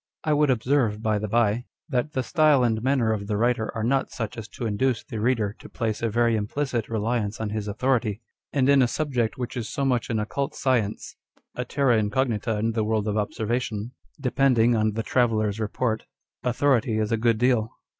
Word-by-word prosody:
I 155 - +2
would 150 0 +3
observe, 120 -3 +1
by 110 -1 +1
the 105 - -3
bye, 115 +2 +1 0.2
that 135 +2 -1
the 130 - 0
style 155 -3 +4
and 110 -2 +1
manner 125 -3 +2
of 100 -2 -4
the 105 -1 -1
writer 115 0 +1
are 110 - -2
not 135 +4 +1
such 110 -4 -5
as 115 -1 -7
to 110 +3 -6
induce 115 +2 0
the 115 - -6
reader 110 -3 +1
to - - -12
place 110 -4 -2
a 115 - +1
very 115 +1 +2
implicit 120 +2 -2
reliance 110 -1 -1
on 110 -2 -3
his 105 -1 -3
authority; 110 -1 0 0.3
and 135 -2 +2
in 140 -1 +6
a 125 - +4
subject 125 -5 -1
which 125 -2 -4
is 115 -3 -4
so 140 - -2
much 125 -3 0
an 115 - 0
occult 115 +6 -2
science, 115 -6 -1 0.4
a 125 - -4
terra 125 -3 +2
incognita 115 -1 0
in 110 +2 0
the 110 -1 0
world 110 -1 0
of 105 - 0
observation, 110 +1 -2 0.3
depending 125 -3 +3
on 110 -1 +1
the 115 +1 -2
traveller's 110 -4 +1
report, 110 +1 -1 0.4
authority 125 -3 +2
is 110 0 0
a - - +3
good 115 0 +2
deal. 120 -2 +2
115 Hz, 200 wpm, -25 LUFS, 110-130 Hz, 0.4 s, in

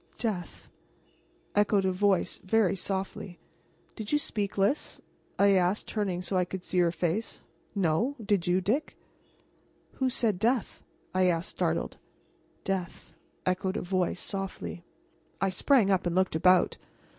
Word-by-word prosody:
"Death," 195 -7 -4 0.9
echoed 205 -1 +3
a 190 - +2
voice, 190 0 +1
very 200 -1 +2
softly. 190 -1 -4 0.6
"Did 215 -2 -6
you 295 - +4
speak, 205 -9 -3
Lys?" 200 +9 0 0.4
I 200 0 +5
asked, 185 +1 +2
turning 190 -4 -2
so 190 - -4
that 185 - +3
I 180 - +2
could 180 0 -6
see 185 - 0
her 170 -1 +4
face. 175 +6 -2 0.3
"No; 195 - +1
did 200 -5 0
you, 180 +1 +3
Dick?" 255 - -1 1.0
"Who 260 -1 +2
said 225 -7 +1
'death'?" 235 +1 0 0.3
I 185 0 +3
asked, 170 0 0
startled. - - -1 0.7
"Death," 190 -3 -4 0.3
echoed 185 +1 0
a - - -2
voice, 180 0 0
softly. 90 - -4 0.6
I 195 - +2
sprang 200 +2 +3
up 185 -2 +2
and 175 - -1
looked 185 -3 +2
about. 180 +3 +4
190 Hz, 145 wpm, -29 LUFS, 180-205 Hz, 1.0 s, I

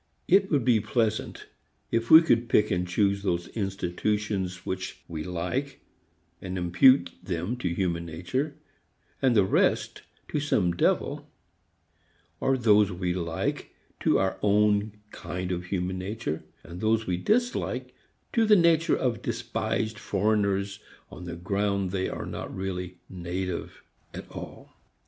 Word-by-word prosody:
It 195 +1 +4
would 140 -6 +1
be 120 -3 +4
pleasant 110 0 -1 0.5
if 115 0 0
we 160 +1 +10
could 120 -6 +2
pick 105 +1 +3
and 90 -1 0
choose 100 +2 +1
those 85 -3 -1
institutions 95 -1 -2
which 95 0 -4
we 80 -2 -5
like 125 - -3 0.6
and 95 0 -4
impute 90 +10 +5
them 90 +5 -3
to 95 -7 -2
human 85 -1 -1
nature, 110 - -3 0.7
and 130 -3 +3
the 100 -3 +5
rest - - +1 0.3
to 150 - -1
some 105 -11 +1
devil; 85 - 0 1.1
or 135 0 +2
those 105 -4 +4
we 90 0 -2
like 85 -2 -3 0.2
to - - +3
our 95 0 0 0.7
kind 90 +1 -5
of 90 0 -3
human 90 0 -2
nature, 95 -4 -4 0.2
and 85 +2 -9
those 110 0 +2
we 90 -1 -1
dislike 240 - 0 0.4
to 230 - +3
the 210 - +7
nature 170 -2 +4
of 125 -4 -1
despised 110 0 -2
foreigners 100 -1 0 0.3
on 90 - -9
the 85 -1 -5
ground 100 +1 -1
they 95 -1 -1
are - - -5
not - - -6
really 90 -2 -4
"native" 90 0 -5 0.3
at - - -7
all. - - -9
100 Hz, 135 wpm, -27 LUFS, 90-115 Hz, 1.1 s, we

